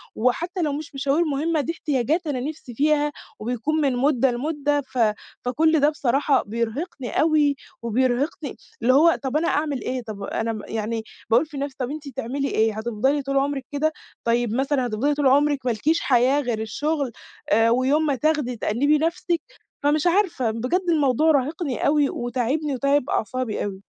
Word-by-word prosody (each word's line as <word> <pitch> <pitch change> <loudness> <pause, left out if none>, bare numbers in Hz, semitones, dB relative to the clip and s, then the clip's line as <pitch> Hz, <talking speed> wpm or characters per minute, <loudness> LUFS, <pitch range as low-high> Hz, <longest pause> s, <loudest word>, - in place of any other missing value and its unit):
وحتّى 340 - 0
لو 295 -3 0
مش 290 -1 -6
مشاوير 280 +5 +1
مهمّة 305 +2 0
دي 325 - -2
إحتياجات 305 +3 -1
أنا 265 -4 -1
نفسي 275 -2 -6
فيها 295 +1 +2 0.3
وبيكون 250 +8 -1
من 270 -3 +1
مدة 265 -1 +3
لمدة، 290 +2 -1
ف 260 -1 -11 0.5
فكُل 315 +5 +3
ده 290 +2 +4
بصراحة 280 -1 +1
بيرهقني 235 - -3
أوي 300 -3 +3 0.3
وبيرهقني 255 +5 -1 0.2
اللي 255 +2 +4
هو 325 +4 +5
طَب 265 +3 0
أنا 330 - 0
أعمل 295 -3 0
إيه؟ 255 -1 -3
طَب 210 -3 -7
أنا 225 0 -2
يعني 220 0 -2 0.3
باقول 240 +7 +4
في 300 -2 -10
نفسي 280 -1 -4
"طَب 255 +2 -2
أنتِ 300 -1 -7
تعملي 275 +3 -3
إيه 220 -1 +1
هتفضلي 240 +6 0
طول 275 0 -1
عمرِك 275 -1 0
كده؟ 310 +2 0 0.3
طيب 235 -1 +1
مثلًا 270 0 +1
هتفضلي 250 +7 0
طول 285 -2 +2
عمرِك 285 0 +3
مالكيش 265 +8 +1
حياة 260 +2 +3
غير 235 -4 -2
الشغل 285 +4 -2 0.4
آآ، 225 +2 +4
ويوم 265 +6 +2
ما 285 -2 +1
تاخدي 300 -4 0
تأنِّبي 280 +8 +2
نفسِك؟" 335 +1 -1 0.4
فمش 295 +3 +2
عارفة 340 - +2
بجد 255 +12 -1
الموضوع 305 0 +3
راهقني 285 0 0
أوي، 290 -1 +3
وتاعبني 255 +5 -1
وتاعب 280 +1 +1
أعصابي 240 +1 -1
أوي. 195 -1 -5
275 Hz, 165 wpm, -23 LUFS, 245-300 Hz, 0.5 s, هو